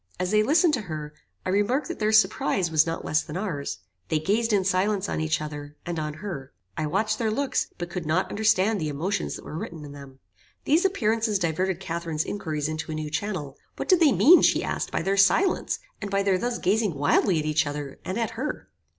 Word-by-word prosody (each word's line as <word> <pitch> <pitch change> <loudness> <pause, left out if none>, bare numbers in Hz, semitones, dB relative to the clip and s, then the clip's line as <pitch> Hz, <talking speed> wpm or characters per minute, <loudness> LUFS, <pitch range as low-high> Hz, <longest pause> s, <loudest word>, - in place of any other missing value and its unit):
As 180 +1 -1
they 215 0 +4
listened 310 - +3
to 250 - +1
her, 150 -1 -5 0.3
I - - -1
remarked 205 +9 +1
that 345 - -6
their 215 0 +1
surprize 195 -4 +2
was 155 0 +4
not 165 - -3
less 155 - +2
than - - -6
ours. 165 - -4 0.3
They 160 - +2
gazed 215 +9 +1
in 200 -3 +2
silence 195 +1 +1
on - - -2
each 155 0 0
other, 150 -1 -7
and 170 -2 -3
on 150 -1 -3
her. 165 -7 -7 0.2
I 155 - -2
watched 215 +8 0
their 225 -2 +1
looks, 275 +5 0
but 175 0 -5
could 175 -3 -4
not 165 +4 +1
understand 210 -1 +2
the 155 - -1
emotions 170 +8 -2
that - - -10
were - - -7
written 160 -4 -7
in 145 - -9
them. 140 -2 -11 0.5
These 320 +6 +3
appearances 225 - +1
diverted 180 +1 -1
Catharine's 170 -3 -3
inquiries 155 -7 -3
into 155 +1 -4
a - - -3
new 155 -1 -4
channel. 160 -8 -3 0.2
What - - -5
did 370 -3 +6
they 315 -5 +6
mean, 345 +7 +7
she - - +3
asked, - - -3
by - - -1
their 195 +2 0
silence, 350 - +3 0.2
and 200 - -4
by 195 0 +1
their 195 -2 +2
thus 240 +3 -1
gazing 205 -2 +1
wildly 145 +5 +2
at 155 - -1
each 155 0 +1
other, 145 -1 -5
and 185 - -3
at 230 -1 -1
her? 255 +6 -5
185 Hz, 220 wpm, -26 LUFS, 155-215 Hz, 0.5 s, mean